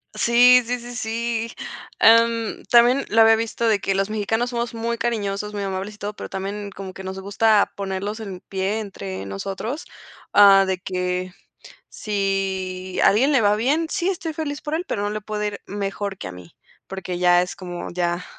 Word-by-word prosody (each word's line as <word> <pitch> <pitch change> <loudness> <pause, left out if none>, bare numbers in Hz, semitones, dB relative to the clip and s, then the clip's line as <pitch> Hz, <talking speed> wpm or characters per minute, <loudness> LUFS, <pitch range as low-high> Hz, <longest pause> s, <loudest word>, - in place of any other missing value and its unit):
Sí, 245 +1 +6
sí, 245 +1 -2
sí, 240 +1 -9
sí, 230 0 -2 0.5
am, 230 0 +4
también 245 +3 +5
lo 225 +1 +4
había 225 0 +7
visto 230 +1 -2
de 215 -2 +4
que 195 0 -1
los 195 +2 0
mexicanos 225 +3 -1
somos 235 -1 -3
muy 230 +1 -2
cariñosos, 210 -3 -2
muy 205 - -3
amables 195 +2 -4
y - - -15
todo, 210 +1 -5
pero - - -7
también 200 +1 -5
como 190 -1 -7
que 190 - -8
nos 190 0 -5
gusta 205 +2 +2
ponerlos 200 +2 -4
en 195 -4 -7
pie 195 +4 -2
entre 100 - -6
nosotros, 195 - -5 0.5
ah, 195 -1 +8
de 190 -1 -1
que 180 -1 -3 0.6
si 190 -2 -2
a - - +8
alguien 250 +9 +3
le 270 -5 +4
va 205 -1 +4
bien: 280 +10 +1
"Sí, 345 +3 -1
estoy 335 -4 -2
feliz 300 -2 -4
por 300 +1 -3
él, 345 +3 -1
pero 205 - -2
no 205 - -1
le 215 0 -3
puede 210 0 -3
ir 205 -1 -5
mejor 200 -1 -4
que - - -7
a 90 - -6
mí", 90 -1 -13 0.3
porque 185 -2 -5
ya 175 0 +5
es 180 - -3
como 175 -2 -7
ya, 175 0 -1
205 Hz, 195 wpm, -22 LUFS, 190-230 Hz, 0.6 s, ah